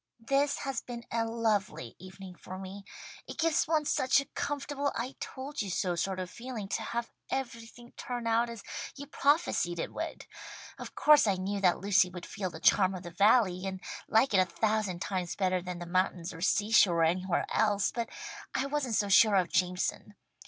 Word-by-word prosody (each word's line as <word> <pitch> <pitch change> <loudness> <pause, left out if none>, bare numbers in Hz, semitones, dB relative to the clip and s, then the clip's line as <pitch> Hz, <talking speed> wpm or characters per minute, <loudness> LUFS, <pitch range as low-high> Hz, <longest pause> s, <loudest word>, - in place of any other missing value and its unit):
"This 280 +1 +2
has 270 -3 -2
been 240 -1 -8
a 230 0 0
lovely 220 - -1
evening 185 +1 -10
for 185 +1 -9
me. 195 +1 -8 0.4
It - - -8
gives 330 -1 +2
one 310 -2 +1
such 260 -1 +3
a 275 - -3
comfortable 285 0 -3
I 250 +4 -3
told 280 +2 -5
you 200 - -4
so 180 0 0
sort 185 +2 -2
of 185 - -3
feeling 235 0 -7
to - - -1
have 235 0 -3 0.2
everything 240 -2 -5
turn 245 -2 -5
out 230 +1 +2
as 230 -3 -8 0.3
you 285 - -8
prophesied 285 - +1
it - - -4
would. - - -5 0.5
Of - - -8
course 300 -6 +6
I 200 - +3
knew 195 +2 -3
that 180 -3 +3
Lucy 195 -2 +4
would 180 0 -8
feel 190 -2 -4
the 160 - -9
charm 185 +2 +4
of 180 - -7
the 175 - -8
Valley, 195 -1 +3
and 190 -1 -4 0.3
like 225 +2 +3
it 190 - +5
a 185 - +5
thousand 210 -1 -1
times 185 -3 -3
better 185 -2 +1
than 180 0 -5
the 175 - -6
mountains 180 -1 -1
or 165 - -10
seashore 205 -3 +4
or - - +5
anywhere 180 +2 +1
else, 205 -2 +2
but 235 -1 -3 0.5
I 265 - +1
wasn't 275 -5 -1
so 205 - +1
sure 205 +1 +6
of 180 -3 +2
Jameson. 180 +3 -1
205 Hz, 195 wpm, -30 LUFS, 185-240 Hz, 0.5 s, course